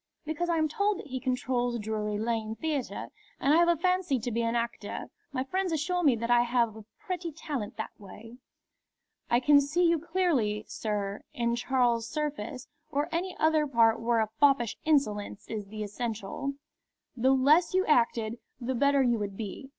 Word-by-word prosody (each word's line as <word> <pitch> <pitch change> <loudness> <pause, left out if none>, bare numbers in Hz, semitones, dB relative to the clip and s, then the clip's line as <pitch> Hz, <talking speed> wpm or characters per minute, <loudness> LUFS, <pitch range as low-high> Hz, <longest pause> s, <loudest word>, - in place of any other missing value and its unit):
"Because 315 +3 -2
I 335 - +2
am 315 -1 +2
told 405 +6 0
that - - -8
he 260 -1 -4
controls 250 -2 -1
Drury 210 -1 -2
Lane 220 0 -2
Theatre, 295 -1 -3 0.3
and 280 - +3
I - - +6
have 340 0 +5
a 345 -1 +3
fancy 365 -4 +1
to 245 +2 -3
be 230 +1 0
an 230 0 0
actor. 235 0 -3 0.2
My 260 -2 -1
friends 370 +6 -1
assure 345 +3 0
me 285 -7 +4
that 230 +1 -2
I 240 0 +6
have 235 -2 +1
a 220 -1 -11
pretty 365 -5 -4
talent 285 -8 -5
that 220 - -4
way." 220 +4 -12 0.9
"I 240 - +4
can 285 +2 +6
see 325 +5 +2
you 335 -1 +3
clearly, 300 - 0
sir, 205 -2 -3
in 235 0 +1
Charles 240 -2 +1
Surface, 280 -5 -4 0.2
or 290 -1 -1
any 355 +3 -2
other 315 -1 +3
part 230 -4 +4
where 230 0 +2
a 215 - -1
foppish 275 -6 +4
insolence 215 -10 0
is 210 -3 -5
the 215 +1 -5
essential. 225 +5 -4 0.6
The 255 +2 +2
less 305 +8 +4
you 375 +1 +3
acted, 235 -4 +2 0.2
the 255 +1 -2
better 280 +2 +3
you 240 -3 +2
would 200 -2 -4
be. 225 +5 -6
255 Hz, 180 wpm, -29 LUFS, 225-310 Hz, 0.9 s, I